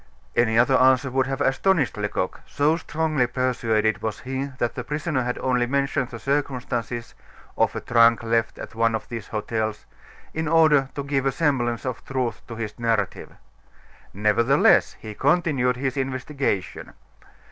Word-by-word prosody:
Any 115 -1 +3
other 125 +3 +4
answer 130 0 +4
would 130 +1 +1
have 135 +1 -3
astonished 145 +2 +2
Lecoq, 105 -3 -2
so 150 +3 +2
strongly 155 -5 0
persuaded 115 -4 0
was 110 -1 -4
he 130 +2 -3
that 120 -2 -1
the 125 - -5
prisoner 150 0 -2
had 125 0 -2
only 125 -2 +1
mentioned 140 -1 0
the 115 - -7
circumstances 125 -4 -2 0.4
of - - +1
a - - -3
trunk 115 -1 +4
left 115 0 0
at - - -8
one 115 0 +1
of 110 - -5
these 115 -3 -6
hotels 110 0 -3 0.5
in 160 0 -2
order 150 -4 +4
to 140 - -3
give 135 -1 0
a - - +2
semblance 125 -5 0
of 125 -3 -4
truth 130 -3 -3
to 115 - -7
his 110 0 -6
narrative. 115 -4 -1 0.8
Nevertheless 110 +6 +3
he 110 - -8
continued 135 -2 +1
his 130 -1 -2
investigation. 135 -6 -3
125 Hz, 155 wpm, -24 LUFS, 115-140 Hz, 0.8 s, other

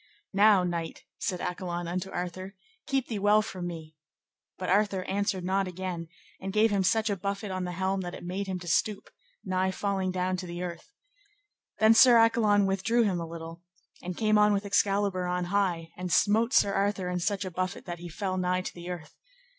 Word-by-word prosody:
Now, 200 -1 +5
knight, 170 -2 -4 0.2
said 180 - -2
Accolon 175 -1 -3
unto 180 +2 -3
Arthur, 185 +2 -5 0.3
keep 270 -2 0
thee 220 -4 -3
well 210 +2 +4
from 185 -4 -5
me; 160 -2 -8 0.6
but 185 - -4
Arthur 195 -1 +2
answered 200 -1 -1
not 190 +1 0
again, 180 -2 -5 0.3
and 195 +1 -4
gave 215 +2 +3
him 200 -1 +2
such 220 +3 +2
a - - 0
buffet 200 +2 -4
on 185 -1 -2
the 180 - -4
helm 190 +2 -1
that 175 -1 -5
it - - -10
made 190 +3 -3
him 190 -1 -2
to 175 - -9
stoop, 205 +4 0 0.3
nigh 185 0 +1
falling 190 -1 -1
down 185 0 -1
to 180 - -6
the 175 +1 -5
earth. 170 - -7 0.9
Then 220 +1 +6
Sir 245 0 +8
Accolon 220 -3 +4
withdrew 195 +5 +2
him 190 -5 0
a 165 - -4
little, 165 0 -8 0.4
and 180 -1 -6
came 215 -1 +3
on 210 0 +5
with 200 0 -1
Excalibur 200 -2 +1
on 180 0 -1
high, 175 -5 0
and 180 0 -5
smote 220 +6 +3
Sir 200 -6 +4
Arthur 195 -2 0
such 200 +2 -1
a 185 - -5
buffet 185 +2 -3
that 175 -2 -6
he 175 0 -8
fell 185 +2 -3
nigh 180 0 0
to - - -6
the 175 0 -9
earth. 170 -4 -7
190 Hz, 200 wpm, -28 LUFS, 180-205 Hz, 0.9 s, Sir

